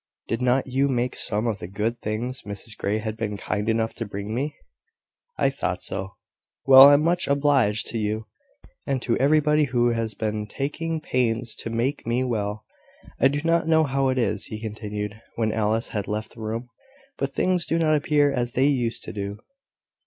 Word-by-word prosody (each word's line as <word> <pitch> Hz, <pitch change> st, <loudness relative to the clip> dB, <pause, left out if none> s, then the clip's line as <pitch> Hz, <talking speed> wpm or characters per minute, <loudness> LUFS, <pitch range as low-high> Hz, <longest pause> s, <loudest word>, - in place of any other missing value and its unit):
Did 115 Hz, +1 st, -2 dB
not 125 Hz, +1 st, +2 dB
you 135 Hz, +2 st, +1 dB
make 125 Hz, -2 st, -1 dB
some 105 Hz, +2 st, 0 dB
of 110 Hz, -3 st, -1 dB
the -, -, -6 dB
good 110 Hz, +5 st, -2 dB
things 120 Hz, +4 st, -3 dB
Mrs 105 Hz, +2 st, -7 dB
Grey 105 Hz, +2 st, -1 dB
has 110 Hz, 0 st, -3 dB
been 110 Hz, -2 st, -4 dB
kind 105 Hz, +2 st, -2 dB
enough 115 Hz, 0 st, 0 dB
to -, -, -4 dB
bring 100 Hz, +1 st, -5 dB
me? 140 Hz, +5 st, -2 dB, 0.8 s
I -, -, +2 dB
thought -, -, -3 dB
so. -, -, -4 dB, 0.5 s
Well, 135 Hz, 0 st, +10 dB
I'm 145 Hz, +1 st, +5 dB
much 175 Hz, +2 st, +1 dB
obliged 140 Hz, -7 st, +2 dB
to 115 Hz, -, -3 dB
you; 110 Hz, +1 st, -2 dB, 0.6 s
and 135 Hz, -1 st, 0 dB
to 115 Hz, -, +1 dB
everybody 150 Hz, +1 st, +3 dB
who 120 Hz, -2 st, +2 dB
has 115 Hz, -2 st, -2 dB
been 105 Hz, -1 st, -2 dB
taking 155 Hz, +6 st, -3 dB
pains 120 Hz, -4 st, 0 dB
to -, -, -4 dB
make 120 Hz, +4 st, -2 dB
me 120 Hz, +2 st, +1 dB
well. 105 Hz, -3 st, -2 dB, 0.5 s
I 135 Hz, -, +6 dB
do 145 Hz, +2 st, -1 dB
not 165 Hz, -1 st, +2 dB
know 160 Hz, -1 st, +4 dB
how 135 Hz, -2 st, +1 dB
it 130 Hz, -, 0 dB
is," 120 Hz, -, 0 dB
he 110 Hz, -, -7 dB
continued, 105 Hz, -1 st, -5 dB
when 110 Hz, -2 st, 0 dB
Alice 110 Hz, +1 st, 0 dB
had 105 Hz, -3 st, -3 dB
left 110 Hz, +1 st, -4 dB
the 115 Hz, -, -12 dB
room, 115 Hz, +3 st, -4 dB, 0.5 s
"but 135 Hz, 0 st, -2 dB
things 180 Hz, -2 st, +1 dB
do 165 Hz, -, +1 dB
not 160 Hz, -2 st, +3 dB
appear 150 Hz, -2 st, +3 dB
as 120 Hz, -2 st, -2 dB
they 130 Hz, -, +3 dB
used 125 Hz, -5 st, 0 dB
to -, -, -7 dB
do. 100 Hz, 0 st, -4 dB
120 Hz, 190 wpm, -24 LUFS, 110-140 Hz, 0.8 s, Well